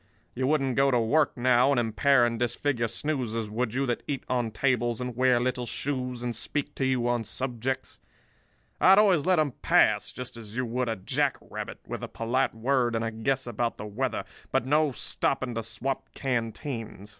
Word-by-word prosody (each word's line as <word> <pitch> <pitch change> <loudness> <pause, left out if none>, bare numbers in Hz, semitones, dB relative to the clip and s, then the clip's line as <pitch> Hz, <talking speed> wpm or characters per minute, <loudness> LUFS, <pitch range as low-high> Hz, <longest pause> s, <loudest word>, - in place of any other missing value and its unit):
You 130 +1 -1
wouldn't 135 -4 +1
go 135 0 +5
to 125 -3 +3
work 135 +8 +2
now, 125 +1 +4
and 140 -3 +3
impair 120 +3 +3
and 115 -1 -1
disfigure 120 0 0
snoozers, 115 -4 -2
would 115 +1 -2
you, 135 +1 +1
that 120 -2 -1
eat 140 -2 -2
on 125 -3 0
tables 120 0 0
and 125 -1 -4
wear 125 0 +4
little 125 0 -1
shoes 125 -3 -3
and 120 -1 -2
speak 145 -1 -2
to 135 - -1
you 125 -2 +1
on 120 -1 +1
subjects? 125 +3 -3 0.8
I - - +5
had 190 - +8
always 190 -7 +4
let 185 -1 +4
'em 155 -3 +2
pass, - - +3
just 125 -2 -7
as 110 0 -9
you 130 - 0
would 120 +1 -1
a 115 - 0
jack 95 - 0
rabbit; - - -7
with - - -6
a - - -3
polite 120 +2 -1
word 120 0 +1
and 115 0 0
a 115 - -2
guess 130 +4 -1
about 120 0 -2
the - - -6
weather, 125 +5 -2 0.3
but - - +1
no 150 +2 +3
stopping 130 0 -1
to 115 - -2
swap 115 +5 -4
canteens. 115 -4 -3
125 Hz, 195 wpm, -27 LUFS, 115-135 Hz, 0.8 s, had